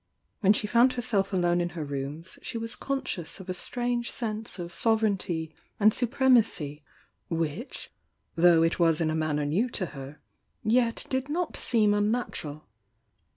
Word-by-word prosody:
When 200 -1 +5
die - - 0
found 240 +3 +5
herself 230 -6 0
alone 175 -2 +2
in 175 - -1
her 155 - -2
rooms 145 +5 -5
she 235 - -5
was 230 +1 -5
con 275 -1 -2
scious 170 +1 -4
of 190 0 -10
a - - 0
strange 240 +4 -2
sense 220 -4 -4
of 175 -1 -6
sovereignty 190 -6 0 0.3
and 215 +1 +6
suprem 255 +2 +4
acy 150 -9 -3 0.5
which, 165 - -3 0.4
though 170 -1 +5
it 165 +2 +1
was 165 -2 +4
in 160 -2 +1
a - - -1
manner 155 -2 0
new 190 +13 +1
to 195 - -2
her, 135 +1 -9 0.4
yet 230 +1 +2
did 260 +1 -1
not 335 +2 -1
seem 215 -4 +2
unnatural. 205 -8 -1
195 Hz, 160 wpm, -28 LUFS, 165-235 Hz, 0.5 s, and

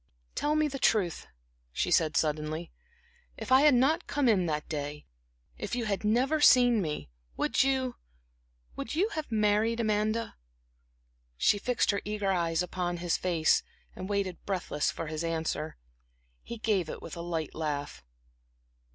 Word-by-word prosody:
"Tell 300 +1 0
me 310 0 +3
the 275 -2 -5
truth," 195 -9 +1 0.4
she - - -1
said, 155 -3 +3
suddenly 155 +2 -1 0.7
"if - - -7
I 260 +1 +7
had 295 -3 +6
not 305 +8 +2
come 285 -2 +1
in 190 -6 +3
that 150 -1 -2
day 150 -1 -5 0.5
if 210 +2 -3
you 240 -2 -2
had 200 -1 -2
never 255 +8 +2
seen 245 -6 +6
me, 150 - -4 0.3
would - - +2
you 260 -2 0 0.8
would 230 - -5
you 390 +7 +2
have 310 - -5
married 215 +2 +2
Amanda?" 215 +1 0 1.0
She 205 - +3
fixed 245 +1 +1
her 200 - -2
eager 205 -1 -1
eyes 170 -2 +1
upon 175 -1 -3
his 170 0 0
face, 170 -4 +2 0.3
and 185 - -6
waited 200 -3 -2
breathless 180 -6 -1
for 165 - -4
his 155 +1 -4
answer. 160 -2 -2 0.6
He 235 - -7
gave 205 -7 0
it - - -7
with 165 - -7
a 170 - -6
light 165 -3 -3
laugh. 145 - -4
200 Hz, 155 wpm, -29 LUFS, 165-240 Hz, 1.0 s, I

